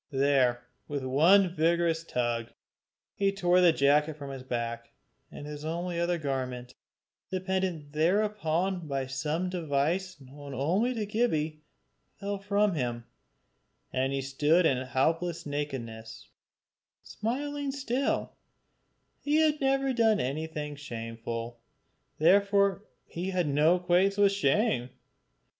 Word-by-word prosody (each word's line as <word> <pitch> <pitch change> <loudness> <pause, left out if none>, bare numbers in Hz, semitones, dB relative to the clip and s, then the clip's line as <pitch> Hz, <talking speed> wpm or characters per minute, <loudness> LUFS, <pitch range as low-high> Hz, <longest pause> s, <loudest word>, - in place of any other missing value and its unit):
There, 135 -3 +2 0.2
with 145 -2 -3
one 170 +8 +4
vigorous 165 0 +1
tug, 120 -6 -2 0.6
he 195 -1 +1
tore 180 -2 +3
the 175 -2 +7
jacket 150 +1 +3
from 140 -2 -8
his 135 -1 -7
back, 115 -2 -4 0.4
and 145 - -9
his 150 0 -7
only 170 +2 -3
other 170 0 +1
garment, 130 -4 -4 0.6
dependent 185 -5 -2
thereupon 180 0 0
by 135 -2 -2
some 150 +7 -2
device 175 +1 -1
known 140 +1 -10
only 190 - +1
to 215 -2 -2
Gibbie, 160 -9 -1 0.6
fell 200 0 -3
from 200 0 +1
him, 120 -5 -2 0.9
and 130 +1 0
he 135 -1 -2
stood 150 +6 +2
in 130 -5 +3
helpless 160 +7 -1
nakedness, 120 -7 -5 0.7
smiling 285 +5 -3
still: 270 -1 -1 0.9
he 295 +1 0
had 310 -1 +3
never 270 0 +2
done 225 -3 +3
anything 150 +2 -3
shameful, 115 -3 -6 0.6
therefore 200 +3 +3 0.3
had 180 -1 -1
no 150 +4 +4
acquaintance 180 +2 +2
with 200 -1 +5
shame. 195 - +1
160 Hz, 115 wpm, -29 LUFS, 135-195 Hz, 0.9 s, the